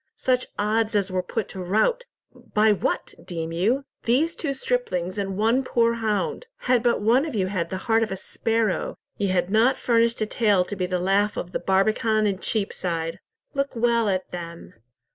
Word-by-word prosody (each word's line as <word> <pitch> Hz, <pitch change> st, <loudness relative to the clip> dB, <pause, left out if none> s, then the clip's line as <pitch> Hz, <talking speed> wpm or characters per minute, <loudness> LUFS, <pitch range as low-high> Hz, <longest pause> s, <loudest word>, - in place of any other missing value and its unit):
such 255 Hz, -1 st, +1 dB
odds 215 Hz, +1 st, +1 dB
as 200 Hz, -2 st, +1 dB
were 185 Hz, 0 st, 0 dB
put 205 Hz, +4 st, -3 dB
to 190 Hz, -, -7 dB
rout—by 220 Hz, -, 0 dB
what, 205 Hz, -, -1 dB
deem 165 Hz, -2 st, -5 dB
you? 225 Hz, +12 st, +1 dB, 0.2 s
These 295 Hz, +8 st, +2 dB
two 290 Hz, -, -2 dB
striplings 205 Hz, -8 st, -2 dB
and 195 Hz, -1 st, -3 dB
one 230 Hz, +5 st, +2 dB
poor 235 Hz, -2 st, +2 dB
hound. 230 Hz, -, -2 dB
Had 250 Hz, -2 st, +2 dB
but 240 Hz, -2 st, +2 dB
one 235 Hz, +6 st, +4 dB
of 305 Hz, -6 st, -4 dB
you 195 Hz, -3 st, +1 dB
had 185 Hz, -3 st, -2 dB
the 185 Hz, -, -3 dB
heart 225 Hz, -1 st, +3 dB
of 225 Hz, -, -1 dB
a 190 Hz, -, -3 dB
sparrow, 225 Hz, +1 st, -1 dB, 0.2 s
ye 200 Hz, -, +1 dB
had 185 Hz, 0 st, 0 dB
not 225 Hz, +5 st, +4 dB
furnished 230 Hz, -1 st, +2 dB
a 215 Hz, -, +1 dB
tale 210 Hz, -4 st, +2 dB
to 205 Hz, -, -5 dB
be 185 Hz, -2 st, -1 dB
the 180 Hz, 0 st, 0 dB
laugh 195 Hz, +3 st, +1 dB
of 175 Hz, -, -4 dB
the -, -, -2 dB
Barbican 215 Hz, +3 st, +2 dB
and 195 Hz, -2 st, -1 dB
Cheapside. 170 Hz, -6 st, -2 dB, 0.3 s
Look 275 Hz, -1 st, -1 dB
well 235 Hz, -2 st, +2 dB
at 185 Hz, -1 st, -2 dB
them. 170 Hz, -1 st, -8 dB
215 Hz, 185 wpm, -24 LUFS, 185-235 Hz, 0.3 s, one